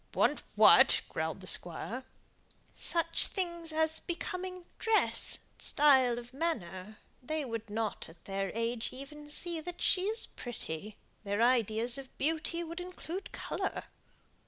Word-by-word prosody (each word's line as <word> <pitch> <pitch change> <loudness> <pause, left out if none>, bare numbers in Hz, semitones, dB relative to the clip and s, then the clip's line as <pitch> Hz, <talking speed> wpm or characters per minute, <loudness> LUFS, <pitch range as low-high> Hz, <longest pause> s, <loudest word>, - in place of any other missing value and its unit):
"Want - - +2
what?" - - +7
growled - - -3
the - - -7
Squire. 260 +1 +2 0.7
"Such 335 -1 +2
things 340 -4 -1
as 320 0 +2
becoming 365 +1 -5
dress, 445 -1 +2 0.2
style 265 -5 +4
of 240 +1 -9
manner. 215 - -3 0.2
They 310 +3 -3
would 225 -3 -5
not 215 -3 -3
at 165 0 -18
their 195 0 -2
age 230 0 -1
even 295 +3 -10
see 335 +2 +1
that 350 +2 -7
she 370 0 +2
is 440 +3 0
pretty; 210 -4 -7 0.3
their 205 +2 0
ideas 235 0 +2
of 265 -1 -12
beauty 325 +3 -1
would 335 +1 -6
include 365 +1 -7
colour." - - -3
275 Hz, 135 wpm, -32 LUFS, 230-340 Hz, 0.7 s, what